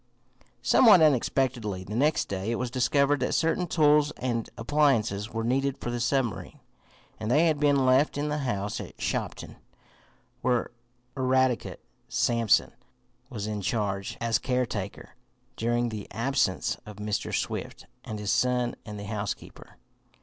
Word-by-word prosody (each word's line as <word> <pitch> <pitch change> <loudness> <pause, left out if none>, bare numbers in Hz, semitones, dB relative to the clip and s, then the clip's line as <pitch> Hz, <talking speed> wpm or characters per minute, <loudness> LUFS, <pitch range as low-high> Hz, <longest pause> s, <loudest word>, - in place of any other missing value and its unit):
Somewhat 210 -9 +7
unexpectedly 125 -8 +1
the 105 +3 -6
next 150 +6 +2
day 95 +2 -3
it 115 - 0
was 125 -1 -3
discovered 140 +3 +2
that 125 - 0
certain 165 +2 +1
tools 150 -2 +4
and 120 -3 -2
appliances 115 -6 +1
were 115 0 -3
needed 135 +3 0
for 120 - -4
the 120 - -3
submarine, 120 -1 -1 0.6
and 110 - -3
they 150 +7 +4
had 155 -3 +2
been 145 -2 +3
left 130 +3 +3
in 145 +1 -1
the 150 0 -1
house 105 -7 -2
at - - -11
Shopton, - - -3 0.8
where 125 -2 0 0.4
Eradicate 130 -2 +1 0.3
Sampson 115 -3 +2 0.6
was 110 -6 -5
in 105 -1 -3
charge 100 -1 -2
as 115 -1 +1
caretaker 120 -6 -3 0.4
during 120 +1 0
the 105 -3 -6
absence 115 - 0
of 105 - -10
Mr. 105 0 -3
Swift - - -3 0.2
and 110 - -6
his 105 -1 -2
son 125 -1 +1
and 105 -1 -6
the 100 - -6
housekeeper. 100 -1 -6
120 Hz, 140 wpm, -27 LUFS, 105-140 Hz, 0.8 s, Somewhat